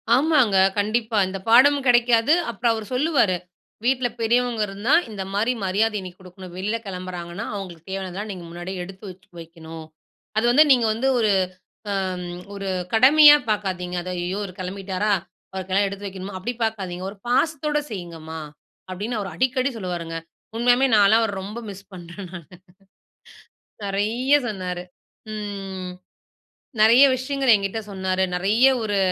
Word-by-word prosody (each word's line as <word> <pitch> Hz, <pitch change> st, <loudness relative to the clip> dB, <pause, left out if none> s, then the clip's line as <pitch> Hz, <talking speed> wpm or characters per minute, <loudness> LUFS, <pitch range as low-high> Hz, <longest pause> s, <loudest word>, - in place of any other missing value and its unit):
ஆமாங்க! 265 Hz, -7 st, +3 dB, 0.2 s
கண்டிப்பா, 220 Hz, +2 st, 0 dB
இந்த 195 Hz, +1 st, -5 dB
பாடமும் 275 Hz, +4 st, +6 dB
கிடைக்காது, 240 Hz, +2 st, +4 dB, 0.2 s
அப்புறம் 235 Hz, +1 st, 0 dB
அவரு 220 Hz, -1 st, -5 dB
சொல்லுவாரு, 250 Hz, -, +2 dB, 0.5 s
வீட்ல 255 Hz, 0 st, +2 dB
பெரியவங்க 240 Hz, 0 st, +1 dB
இருந்தா, 205 Hz, +8 st, -1 dB, 0.2 s
இந்த 200 Hz, -3 st, -5 dB
மாரி 220 Hz, +5 st, +1 dB
மரியாதை 210 Hz, +3 st, +1 dB
நீ -, -, -5 dB
குடுக்கணும். 185 Hz, -1 st, -12 dB
வெளில 205 Hz, +4 st, -2 dB
கெளம்புறாங்கன்னா, 180 Hz, +1 st, -6 dB
அவுங்களுக்கு 180 Hz, -4 st, -8 dB
தேவையானதெல்லாம் 195 Hz, +2 st, -5 dB
நீங்க 185 Hz, -3 st, -8 dB
முன்னாடியே 175 Hz, +2 st, -6 dB
எடுத்து 190 Hz, +3 st, -11 dB
வச்சு, 185 Hz, +1 st, -19 dB
வெக்கணும். 165 Hz, -1 st, -10 dB, 0.5 s
அது 220 Hz, -, +2 dB
வந்து 290 Hz, +5 st, +7 dB
நீங்க 245 Hz, -3 st, +5 dB
வந்து 235 Hz, +5 st, -1 dB
ஒரு 215 Hz, -2 st, +3 dB, 0.6 s
அம் 185 Hz, -2 st, -3 dB, 0.2 s
ஒரு 195 Hz, -1 st, -5 dB, 0.3 s
கடமையா 295 Hz, +5 st, +8 dB, 0.2 s
பார்க்காதீங்க. 185 Hz, -4 st, -2 dB
அது 185 Hz, -, -6 dB
"ஐயய்யோ! 180 Hz, +2 st, -3 dB
இவர் 185 Hz, -3 st, -8 dB
கெளம்பிட்டாரா! 190 Hz, +2 st, -3 dB, 0.4 s
அவருக்கெல்லாம் 190 Hz, +1 st, 0 dB
எடுத்து 200 Hz, +1 st, -7 dB
வைக்கணுமா" 190 Hz, 0 st, -7 dB
அப்டி 220 Hz, +7 st, -3 dB
பார்க்காதீங்க. 190 Hz, -5 st, -3 dB
"ஒரு 205 Hz, -, -13 dB
பாசத்தோட 295 Hz, +3 st, +1 dB
செய்யிங்கம்மா" 165 Hz, -5 st, -7 dB, 0.5 s
அப்டின்னு 210 Hz, +5 st, -3 dB
அவர் 195 Hz, -2 st, -5 dB
அடிக்கடி 255 Hz, +7 st, +1 dB
சொல்லுவாருங்க. 175 Hz, -5 st, -4 dB, 0.4 s
உண்மயாமே 245 Hz, +3 st, +4 dB
நான்லா 205 Hz, +2 st, +6 dB
அவர 220 Hz, -2 st, 0 dB
ரொம்ப 210 Hz, +4 st, -7 dB
மிஸ் 195 Hz, 0 st, -10 dB
பண்ணுறேன் 175 Hz, +1 st, -9 dB
நானு. 170 Hz, -5 st, -10 dB, 1.3 s
நெறைய 220 Hz, +8 st, +1 dB
சொன்னாரு. 180 Hz, -4 st, -4 dB, 0.5 s
ம். 195 Hz, -3 st, -5 dB, 0.9 s
நெறைய 235 Hz, +6 st, +7 dB
விஷயங்கள் 265 Hz, -1 st, +2 dB
என்கிட்ட 200 Hz, +2 st, -2 dB
சொன்னாரு. 190 Hz, -1 st, -1 dB
நெறைய 210 Hz, +8 st, +3 dB, 0.2 s
ஒரு 205 Hz, -2 st, -1 dB
200 Hz, 135 wpm, -23 LUFS, 185-235 Hz, 1.3 s, கடமையா